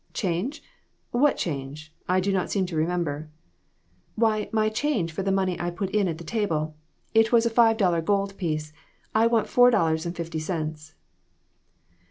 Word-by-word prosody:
"Change? 195 - -2 0.5
What 275 +4 +3
change? 150 0 -5 0.2
I 185 +1 +3
do 195 +1 0
not 185 -2 0
seem 195 -2 0
to 175 -2 -6
remember." 155 -2 -1 0.9
"Why, 215 -2 +1
my 215 -1 +2
change 220 - -1
for 160 - -4
the 195 0 0
money 190 -2 0
I 175 - -1
put 190 +2 -4
in 210 -2 +2
at 165 -2 -3
the 170 - -9
table. 155 -6 -1 0.4
It 225 0 +4
was 235 -1 +4
a 235 - +1
five 225 -1 +4
dollar 180 -5 +2
gold 195 +2 0
piece. 155 -4 -3 0.4
I 220 +1 +4
want 230 -2 +2
four 245 0 +6
dollars 160 -7 +1
and 170 - -4
fifty 165 -1 -4
cents." 155 -1 -4
185 Hz, 175 wpm, -25 LUFS, 160-215 Hz, 0.9 s, four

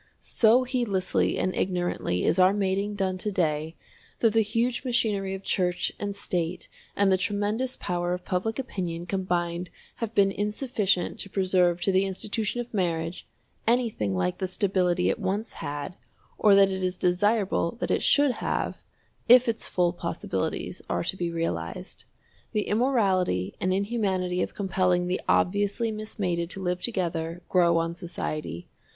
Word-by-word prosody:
So 235 +3 +3
heedlessly 235 -8 0
and 185 - 0
ignorantly 175 - -1
is 185 - +2
our 185 +1 +6
mating 200 +1 0
done 190 -2 -1
to 210 - -2
day 160 -3 -1 0.4
that 225 -3 +3
the 225 - +5
huge 230 +4 0
machinery 210 -6 0
of 195 - -9
Church 180 -3 0
and 200 -1 -3
State 175 -3 -3 0.3
and 200 -1 +3
the 185 - +3
tremendous 210 +6 -1
power 175 -1 -2
of 180 0 -3
public 190 +5 -1
opinion 180 -10 -4
combined 175 -2 -1 0.3
have 230 -1 -4
been 195 -1 +4
insufficient 210 -2 0
to 195 - -1
preserve 180 -2 +2
to 195 - +2
the 190 +1 +3
institution 210 +4 -2
of 240 0 -5
marriage 170 -3 -2 0.4
anything 225 - +1
like 90 0 -1
the 190 - -1
stability 180 -2 +1
it - - -4
once 205 +3 -2
had, 145 +1 -5 0.4
or 205 -2 +5
that 195 0 +6
it 190 0 -3
is 185 0 -1
desirable 190 0 +1
that - - -1
it - - +2
should 285 -2 +4
have, - - -2 0.5
if 250 +1 +8
its 230 -1 -1
full 175 -1 +1
possibilities 175 0 -3
are - - 0
to 170 - -1
be 175 -2 -2
realized. 85 - -4 0.5
The 210 - +1
immorality 200 - +1
and 185 - +1
inhumanity 190 -3 0
of - - -3
compelling 185 -3 +1
the 180 +1 -1
obviously 205 +4 +2
mismated 190 -5 -3
to 195 - -5
live 180 0 -1
together, 170 -5 -2
grow 170 -2 +4
on 165 0 0
society. 155 - -5
190 Hz, 155 wpm, -27 LUFS, 175-210 Hz, 0.5 s, if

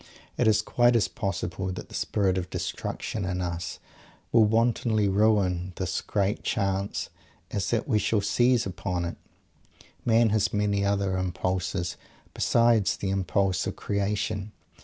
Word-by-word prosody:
It 120 - +2
is 110 -1 +4
quite 120 0 +3
as 115 - +3
possible 95 -3 -3
that 90 - -7
the - - -13
spirit 95 -3 0
of 90 - -6
destruction 105 - -4
in 90 0 -2
us 85 -1 -3 0.5
will 115 -2 +6
wantonly 115 -1 +2
ruin 95 -3 +2
this 95 -1 -2
great 100 0 -1
Chance 100 0 -1 0.4
as 100 -3 -1
that 115 - 0
we 110 -6 +2
shall 105 +1 +1
seize 120 +4 +3
upon 90 -1 -3
it. 85 - -5 0.9
Man 115 0 +4
has 110 -1 +1
many 105 -1 +1
other 100 -1 +1
impulses 90 -1 -2 0.4
besides 115 -4 +3
the 95 - -2
impulse 95 0 0
of - - -3
creation. 100 0 -2
100 Hz, 140 wpm, -27 LUFS, 95-110 Hz, 0.9 s, will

